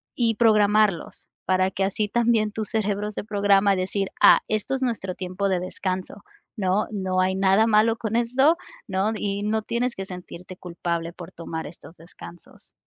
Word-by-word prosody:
y 230 -2 +1
programarlos, 210 -4 +2 0.2
para 185 0 +2
que 195 0 -2
así 200 +2 -1
también 225 -1 +1
tu 220 - -3
cerebro 210 -1 -2
se 205 - -6
programa 200 -1 +3
a - - +3
decir: 190 +1 -2
"Ah, - - +8
esto 215 +5 -2
es 265 - -4
nuestro 210 -7 -2
tiempo 185 +2 -3
de 185 - +1
descanso", 185 +2 -5 0.3
¿no?, 195 +1 0
no 190 -3 -1
hay 185 0 +1
nada 195 +3 +3
malo 225 +1 +3
con 225 -1 -3
esto, 255 +7 +3 0.3
¿no?, 195 +3 0
y 200 0 -2
no 220 +1 0
tienes 235 +3 -2
que 195 - -5
sentirte 180 0 -10
culpable 170 -1 -4
por 175 -1 -10
tomar 165 -1 -6
estos 165 +2 -14
descansos. 170 +1 -12
200 Hz, 175 wpm, -24 LUFS, 185-215 Hz, 0.3 s, Ah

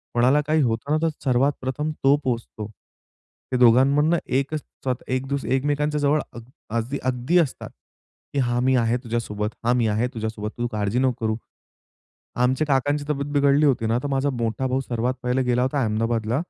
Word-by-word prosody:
कोणाला 130 +5 +4
काही 155 0 +3
होतं 115 +4 -1
ना, 155 - +3
तर - - +2 0.2
सर्वात 135 +3 +3
प्रथम 150 +4 -2
तो 140 +1 +6
पोहचतो. 115 -4 -3 0.8
ते 125 - +1
दोघांमधनं 140 +7 +5
एकच 140 +4 -1 0.2
स्व 130 -1 +1 0.2
एक 130 +1 -1
दु 140 +1 0 0.2
एकमेकांच्या 145 +2 0
जवळ 145 +2 +3
अग 120 - -8 0.3
आजही 120 +5 -2
अगदी 130 +7 +1
असतात. 155 -6 -2 0.6
की 140 - 0
"हां, 120 -1 +1
मी 130 0 +3
आहे 120 0 +2
तुझ्यासोबत 105 -3 -2 0.2
हां 120 +1 +3
मी 115 -2 +2
आहे 110 +4 +1
तुझ्यासोबत, 110 -1 -4
तू 120 0 -1
काळजी 105 +3 -1
नको 125 -4 0
करू." 110 0 +1 1.1
आमच्या 130 +5 +1
काकांची 145 +1 +1
तब्येत 145 0 -2
बिघडली 145 +1 +4
होती 125 -5 +2
ना, 115 +2 +1
तर - - -1
माझा 135 +1 +1
मोठा 120 +1 -2
भाऊ 130 +1 0
सर्वात 125 0 -1
पहिले 125 +1 +1
गेला 125 0 +1
होता 135 +1 0
अहमदाबादला 115 +3 0
130 Hz, 180 wpm, -23 LUFS, 115-140 Hz, 1.1 s, तो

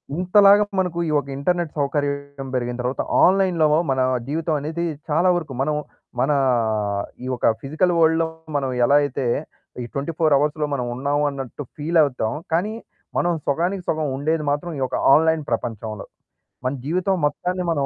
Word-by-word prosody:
ఇంతలాగా 200 +3 +6 0.2
మనకు 180 -2 -1
ఈ - - -1
ఒక 140 - -8
ఇంటర్నెట్ 170 +3 -1
సౌకర్యం 140 -1 -2
పెరిగిన 120 -1 -1
తరువాత, 125 +2 -2 0.2
ఆన్‌లైన్‌లో 185 -4 +3 0.2
మన 130 -1 +1 0.3
జీవితమనేది 155 +1 -2 0.3
చాలా 165 +5 +3
వరకు 160 -6 -3
మనం, 150 +2 0 0.5
మన 135 - +2 0.9
ఈ - - -4
ఒక 120 - +3
ఫిజికల్ 160 +6 +1
వరల్డ్‌లో 160 0 +3 0.3
మనమెలా 130 0 +2
అయితే 140 -2 -2 0.6
ఈ - - -5
24 155 +1 +1
అవర్స్‌లో 150 +1 0
మనమున్నామన్నట్టు 140 +2 -2
ఫీలవుతాం. 145 -7 +1 0.2
కానీ, 190 +6 +1 0.5
మనం 175 - +1 0.2
సొగానికి 175 +6 0
సొగం 155 -1 0
ఉండేది 155 +3 0
మాత్రం 145 +4 -2
ఈ - - -4
ఒక - - -3 0.2
ఆన్‌లైన్ 160 +1 +3
ప్రపంచంలో. 110 -2 -3 0.6
మన 130 - +1
జీవితం 185 +5 +1
మొత్తాన్ని 180 +5 -2
మనం 145 -4 0
150 Hz, 135 wpm, -22 LUFS, 140-170 Hz, 0.9 s, ఇంతలాగా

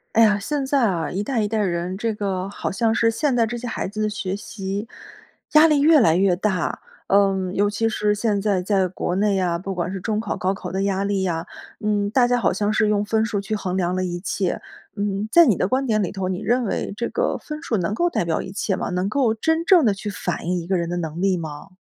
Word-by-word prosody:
哎 230 - +7
呀， 210 -2 +4
现 275 +6 -2
在 275 0 +2
啊， 165 -5 -2
一 195 +3 -2
代 240 0 -1
一 210 - 0
代 220 +1 -2
人， 180 -2 -1
这 225 +2 -1
个 195 -2 -3
好 200 - -4
像 225 +3 +1
是 230 0 +3
现 270 +5 0
在 235 -2 +3
这 240 +2 -4
些 240 - -7
孩 230 - -3
子 215 +3 -5
的 215 - +1
学 195 -2 -3
习 200 0 -5 0.7
压 305 +1 +8
力 300 -2 +3
越 300 0 +6
来 165 -5 +4
越 190 -1 +3
大， 190 -2 -1 0.3
嗯， 195 -2 +2
尤 205 +1 +2
其 225 +2 0
是 210 -1 +1
现 210 -1 0
在 195 -3 +1
在 190 -1 +1
国 180 0 -3
内 200 0 +2
啊， 175 -2 0
不 195 +3 -5
管 180 -1 -2
是 190 - -5
中 215 +1 -1
考、 220 - -3
高 190 +1 0
考 - - -7
的 190 +1 -2
压 195 0 0
力 200 -1 0
啊， 165 -2 -2 0.3
嗯， 205 -1 0
大 245 +2 +3
家 245 - +2
好 240 - +2
像 205 +3 0
是 215 0 +2
用 205 -1 +1
分 220 +1 +1
数 215 -3 -2
去 200 +2 -3
衡 190 -3 -3
量 180 0 0
了 185 - -1
一 175 -1 -3
切。 185 0 -2 0.4
嗯， 200 +1 -2
在 340 0 +7
你 230 -9 +4
的 185 - 0
观 265 +1 +1
点 215 -3 +1
里 180 - -2
头， 190 -2 -3
你 185 -1 -2
认 240 +2 +1
为 200 - -2
这 235 - -1
个 - - -1
分 305 +1 -8
数 235 -10 0
能 180 +2 -1
够 345 +10 +1
代 180 - -1
表 165 -1 0
一 185 - -7
切 195 0 -1
吗？ - - -3
能 180 +1 -1
够 230 +1 +2
真 320 +8 0
正 345 -5 +5
地 210 - +4
去 195 +2 -6
反 200 - -4
映 180 +1 0
一 170 - -7
个 190 - +1
人 170 -1 -2
的 175 - -2
能 165 0 -4
力 190 -1 +2
吗？ 155 +1 -7
200 Hz, 285 characters per minute, -22 LUFS, 185-225 Hz, 0.7 s, 压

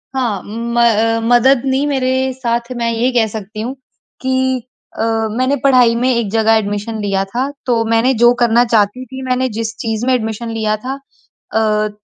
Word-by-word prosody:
हाँ 230 -7 -1
म 235 +3 -3
अ, 225 0 +3
मदद 245 +2 +4
नहीं 265 +1 +1
मेरे 265 -3 0 0.2
साथ 235 -1 -2
मैं 235 -1 0
ये 235 +3 0
कह 235 -3 +2
सकती 215 0 -7
हूँ 245 +4 -4 0.5
कि 260 0 0 0.4
अ, - - 0 0.4
मैंने 255 +2 +1
पढ़ाई 250 -4 +5
में 250 +2 +1
एक 230 -3 -1
जगह 225 0 +3
एडमिशन 210 +1 -3
लिया 195 -1 0
था। 245 +8 -2 0.2
तो 235 -3 +1
मैंने 230 +3 +3
जो 240 0 +7
करना 240 0 +4
चाहती 225 +2 +1
थी, 265 +1 -9
मैंने 255 +1 +1
जिस 225 0 -3
चीज़ 225 0 -2
में 260 - +2
एडमिशन 225 -1 -2
लिया 220 -1 -1
था 270 +2 -4 0.5
अ, 215 -1 +1
235 Hz, 180 wpm, -16 LUFS, 220-255 Hz, 0.5 s, जो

